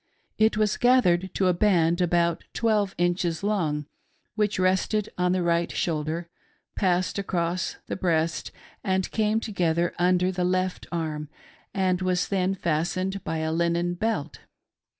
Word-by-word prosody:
It 220 0 +4
was 215 -1 +1
gathered 190 -8 +3
to 190 - +1
a 180 - +4
band 175 -2 +2
about 170 -1 +1
twelve 210 -4 +1
inches 175 -1 0
long, 160 -8 0 0.5
which 210 -1 0
rested 190 +3 +1
on 180 0 +1
the 185 -1 +1
right 170 0 +1
shoulder, 160 +1 -2 0.5
passed 185 0 +1
across 180 -2 -1
the - - -4
breast, 165 -3 0 0.3
and 190 -2 0
came 220 0 +1
together 175 -5 0
under 180 +1 +3
the 180 -1 -2
left 185 +1 -1
arm, 155 -3 -3 0.4
and 185 -2 0
was 185 -1 0
then 190 -1 +1
fastened 185 +3 -1
by 160 +1 -2
a 160 - -1
linen 170 +1 +1
belt. 175 -6 -2
180 Hz, 140 wpm, -26 LUFS, 170-195 Hz, 0.5 s, It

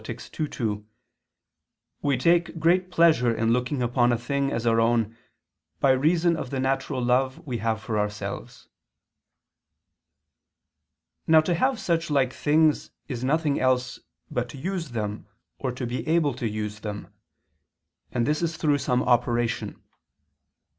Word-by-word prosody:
ii, 115 - -3 0.3
2) 105 -6 -3 1.2
"we 140 -3 +1
take 170 +5 +2
great 180 +3 +2
pleasure 165 -9 +4
in 115 0 +1
looking 125 +2 -1
upon 120 0 +2
a 120 - +2
thing 140 +3 -1
as 115 0 -2
our 115 -1 +3
own, 115 -1 +1 0.6
by 135 - +4
reason 165 +6 +3
of 145 -5 -5
the 135 - -3
natural 135 +1 -1
love 130 +3 +1
we 125 -5 -3
have 110 +1 -1
for 110 0 -2
ourselves." 105 0 -5 2.6
Now 160 -1 +7
to 175 +3 0
have 255 +7 +1
such 170 -3 0
like 135 -3 +2
things 155 +1 +2 0.2
is 125 -3 -5
nothing 150 +1 +1
else 130 -1 +1 0.3
but - - -2
to - - -9
use 175 +1 -3
them 105 -2 -4 0.3
or 130 - -2
to 125 +1 -5
be 120 +5 -4
able 160 -3 +2
to 120 -2 -3
use 105 0 -4
them: 105 -2 -7 1.0
and 120 - 0
this 150 +3 0
is 165 -1 -1
through 145 -3 +2
some 125 -2 +1
operation. 120 -1 0
130 Hz, 145 wpm, -25 LUFS, 115-155 Hz, 2.6 s, Now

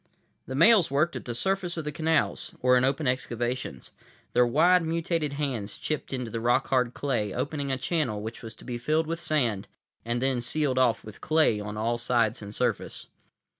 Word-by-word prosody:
The 130 - -4
males 185 +2 +6
worked 155 +5 +1
at - - -6
the 120 - -4
surface 190 +4 -1
of 160 - -4
the 150 - -2
canals, 160 +1 0
or 125 0 +4
in 125 - +3
open 135 +3 +1
excavations. 120 - -3 0.4
Their 125 0 +4
wide, 175 +8 +4
mutated 165 -2 -1
hands 130 -8 -3
chipped 155 -2 -3
into 125 -4 -3
the 115 - -3
rock 120 +3 +1
hard 125 -2 +1
clay, 120 -8 -1
opening 145 -2 -2
a 130 - 0
channel 135 -6 -1
which 110 +4 -7
was 115 -2 -9
to - - -15
be 120 -1 -4
filled 155 +6 +1
with 165 +1 -3
sand 120 - 0 0.4
and 120 +1 -1
then 130 -1 0
sealed 130 +1 +1
off 120 -3 +2
with 110 - -12
clay 155 -9 +3
on 105 0 -6
all 115 +2 0
sides 120 -1 +1
and 105 0 -8
surface. - - -2
130 Hz, 195 wpm, -27 LUFS, 120-155 Hz, 0.4 s, males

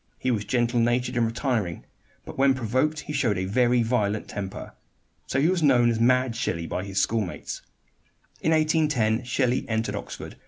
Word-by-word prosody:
He 130 - -1
was 105 -3 -1
gentle 120 -1 +1
natured 120 +2 +1
and 120 -2 +2
retiring; 115 - -2 0.4
but - - -9
when 135 0 +3
provoked 130 +6 0
he 150 - -7
showed 115 -9 +1
a 95 - -1
very 120 +4 +2
violent 110 -3 0
temper. 95 -1 -6 0.5
So 130 - 0
he 145 - +3
was 180 -1 +1
known 125 -5 +4
as 115 - -2
"Mad 125 0 +3
Shelley" 85 -8 -2
by 90 - -3
his 100 0 -2
schoolmates. 110 -6 -2 0.8
In 160 - +1
1810 150 -8 +2
Shelley 125 0 +1
entered 110 0 -1
Oxford. - - -7
120 Hz, 170 wpm, -25 LUFS, 110-130 Hz, 0.8 s, known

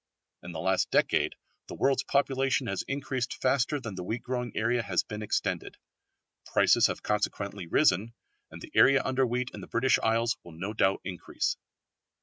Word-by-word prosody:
In 85 - -8
the 80 - -6
last 95 +2 +1
decade - - +2 0.3
the - - -7
world's 135 -1 +2
population 135 -2 +1
has 95 - -2
increased 135 -3 -3
faster 135 +2 +1
than 115 -6 -6
the 90 -1 -6
wheat 115 +6 -4
growing 125 -2 -3
area 120 +2 +1
has 95 -5 0
been 105 0 -7
extended. 105 - -2 0.7
Prices - - +4
have - - -5
consequently 100 -3 -2
risen, 115 - +2 0.3
and - - -11
the - - -10
area 135 0 +5
under 130 0 +1
wheat 125 +1 -2
in - - -8
the - - -9
British 130 +3 +2
Isles 115 +1 +1
will 85 - -12
no 95 +6 -5
doubt 95 -3 +2
increase. 90 -2 -2
115 Hz, 170 wpm, -29 LUFS, 100-130 Hz, 0.7 s, area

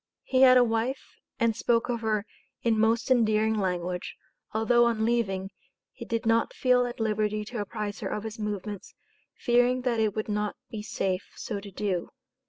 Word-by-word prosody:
He 260 0 +1
had 255 -1 +8
a 250 - +7
wife, 235 +3 -2 0.2
and 230 -1 +2
spoke 230 0 +1
of 235 -2 -2
her 215 -2 0 0.4
in 225 -2 +2
most 225 +2 +2
endearing 220 -3 +3
language, 180 -3 -2 0.4
although, 240 +2 +3
on 225 -2 +1
leaving, 195 -5 0 0.4
he 235 - -9
did 230 +1 -2
not 225 0 +2
feel 250 -1 +3
at 240 - -7
liberty 215 -1 0
to 240 -1 -4
apprise 205 0 -4
her - - -3
of 210 - -3
his 220 0 -6
movements, 210 -1 -5 0.4
"fearing 245 +1 +3
that 245 -2 0
it 215 -2 +1
would 215 - -2
not 210 0 -1 0.2
be 220 -3 -5
safe 190 -2 -2
so 205 -3 -4
to 200 0 -9
do." 190 -2 -2
220 Hz, 180 wpm, -27 LUFS, 210-235 Hz, 0.4 s, had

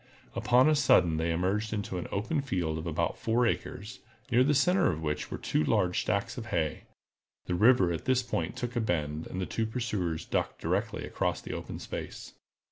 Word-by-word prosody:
Upon 125 +3 +4
a 155 - +5
sudden 90 - +4
they 80 +1 0
emerged 100 +6 0
into 100 -3 -3
an - - -5
open 120 +9 -1
field 85 - -2
of 80 - -6
about 80 - -1
four 120 +2 +2
acres, 115 0 -3 0.3
near 125 +1 +5
the 145 +2 +3
center 180 +1 +4
of 80 -1 -5
which 75 -1 -2
were - - -4
two 75 - 0
large 90 +4 +2
stacks 100 +4 -1
of 110 - -7
hay. 80 -7 -1 0.6
The - - -2
river 95 -1 +5
at 85 -1 -4
this 130 -1 +2
point 85 -8 -2
took 120 0 -4
a 120 - +1
bend, 75 -6 -1
and 95 - -5
the 95 - -1
two 110 +3 -2
pursuers 105 -9 -2
struck - - -2
directly - - -1
across - - -1
the - - -7
open - - -6
space. - - -7
100 Hz, 200 wpm, -29 LUFS, 85-120 Hz, 0.6 s, a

